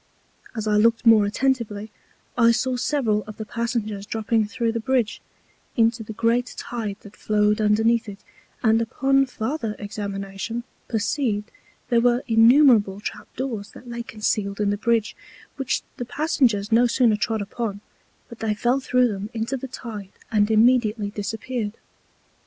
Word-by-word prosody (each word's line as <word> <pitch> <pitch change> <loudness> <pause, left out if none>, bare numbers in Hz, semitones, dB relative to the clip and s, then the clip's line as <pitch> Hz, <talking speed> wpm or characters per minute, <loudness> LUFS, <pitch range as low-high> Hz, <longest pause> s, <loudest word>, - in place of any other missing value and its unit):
As 220 -2 -3
I 210 0 +3
looked 230 +2 +3
more 220 -3 +6
attentively, 220 -3 -1 0.4
I 235 -1 +5
saw 250 +2 +1
several 245 -5 0
of 215 - -10
the 220 - -5
Passengers 215 -3 -3
dropping 220 0 0
thro' 230 +1 -1
the 230 - -2
Bridge, 245 -2 0 0.6
into 230 0 +3
the 220 - -7
great 230 +3 0
Tide 215 -4 -4
that 205 - -14
flowed 210 0 +1
underneath 220 +2 +2
it; 200 - -8 0.5
and 225 0 +4
upon 270 +3 +2
farther 225 -2 -3
Examination, 200 +2 -5 0.2
perceived 220 -1 -1 0.4
there 235 -1 +4
were 245 +1 +2
innumerable 225 -3 +5
Trap 210 - -7
doors 230 -6 -4
that 250 - -13
lay 235 0 -4
concealed 210 -3 -2
in 205 -1 +1
the - - +1
Bridge, 225 0 0 0.4
which 270 -2 -1
the 245 - -4
Passengers 240 - +1
no 240 +2 +5
sooner 235 -2 +3
trod 220 +1 -1
upon, 205 0 -4 0.5
but 235 - -12
they 215 -1 -1
fell 245 +5 +1
thro' 250 -1 +2
them 205 -1 -4
into 225 +4 -2
the 265 0 -5
Tide 215 -6 -8 0.2
and 210 -1 +3
immediately 220 -2 +3
disappeared. 215 +2 -4
225 Hz, 150 wpm, -23 LUFS, 210-240 Hz, 0.6 s, more